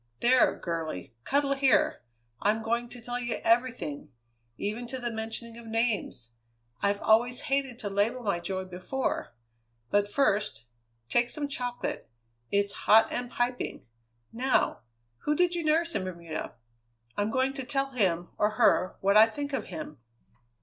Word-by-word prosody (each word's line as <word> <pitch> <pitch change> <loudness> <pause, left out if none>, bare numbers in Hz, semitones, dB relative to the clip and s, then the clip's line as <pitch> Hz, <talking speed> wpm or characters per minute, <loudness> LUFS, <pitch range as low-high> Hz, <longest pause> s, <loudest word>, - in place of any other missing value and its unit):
There, 250 +1 +4
girlie! 160 - -4
cuddle 280 0 +2
here! 270 - +3 0.4
I'm 215 +2 +2
going 235 +1 -1
to 245 - -9
tell 245 +1 -4
you 240 -1 -2
everything; 230 - +1 0.5
even 220 +4 -3
to 260 +2 -5
the 240 -2 -3
mentioning 225 +1 -5
of 235 - -11
names! 220 - -1 0.5
I've 200 0 +1
always 240 +3 +3
hated 270 -3 -1
to 215 -4 -4
label 225 +6 +1
my 200 -5 0
joy 185 +2 -3
before. 185 - -3 0.6
But, 205 0 +3
first, 205 - +1 0.4
take 240 - +2
some 295 -2 -2
chocolate; 245 - -4 0.4
it's 200 0 +2 0.2
hot 220 +1 +7
and 245 0 -2
piping. 245 +1 -2 0.5
Now! 255 +3 +1 0.4
Who 300 - 0
did 355 +2 +3
you 345 -1 -2
nurse 325 +2 +2
in 195 - -1
Bermuda? 170 -7 -5 0.6
I'm 205 +1 0
going 260 +3 +1
to 270 -1 -5
tell 270 +1 -1
him, 180 -8 +1
or 210 +1 +2
her, 185 - +4
what 200 +1 +3
I 220 +1 +9
think 285 +5 -5
of - - -1
him!" 155 -5 -7
230 Hz, 150 wpm, -29 LUFS, 200-255 Hz, 0.6 s, I